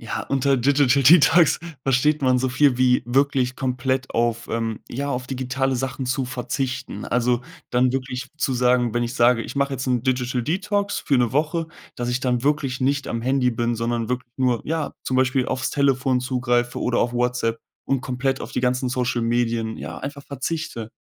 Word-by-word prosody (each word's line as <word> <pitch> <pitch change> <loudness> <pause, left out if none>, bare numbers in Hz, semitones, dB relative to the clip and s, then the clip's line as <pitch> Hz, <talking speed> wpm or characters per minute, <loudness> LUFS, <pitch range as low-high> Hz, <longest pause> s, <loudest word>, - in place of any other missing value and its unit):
Ja, 115 - -4
unter 135 0 +2
Digital 140 +1 +3
Detox 160 +3 +6 0.2
versteht 140 +3 +2
man 130 -1 +3
so 130 +1 0
viel 130 0 +3
wie 125 -1 +3
wirklich 130 0 +1
komplett 130 0 -1
auf, 115 0 0
ähm, 115 -1 -2
ja, 140 +4 -3
auf 125 -1 -3
digitale 130 +1 -1
Sachen 130 +1 -3
zu 130 +1 0
verzichten. 125 0 -4
Also, 125 0 +1 0.3
dann 125 +1 +2
wirklich 130 -1 -4
zu 140 - 0
sagen 125 -1 +2
wenn 120 - +1
ich 120 0 -3
sage: 120 -1 +4
„Ich - - -8
mache 140 0 +1
jetzt 130 0 -4
'n 125 -2 +1
Digital 125 -1 0
Detox 200 - -1
für 140 -4 +1
'ne 120 -2 +1
Woche," 160 +4 0 0.3
dass 120 0 -3
ich 125 +1 -1
dann 125 -2 0
wirklich 140 -3 0
nicht 140 +2 0
am 115 - -2
Handy 130 0 +2
bin, 120 0 -1
sondern 115 0 -2
wirk 125 0 -1
nur, 125 -3 +1
ja, 160 -1 -2
zum 130 - -1
Beispiel 130 0 +2
aufs 130 -1 -2
Telefon 135 -2 +2
zugreife 120 -1 0
oder 125 -1 +1
auf 120 - 0
Whatsapp 120 -2 0 0.3
und 135 -1 0
komplett 135 +1 -2
auf - - -7
die - - -1
ganzen 125 0 0
Social 125 -1 -1
Medien, 115 -1 0
ja, - - -7
einfach 140 +1 -7
verzichte. 140 -4 -4
125 Hz, 190 wpm, -23 LUFS, 120-135 Hz, 0.3 s, Detox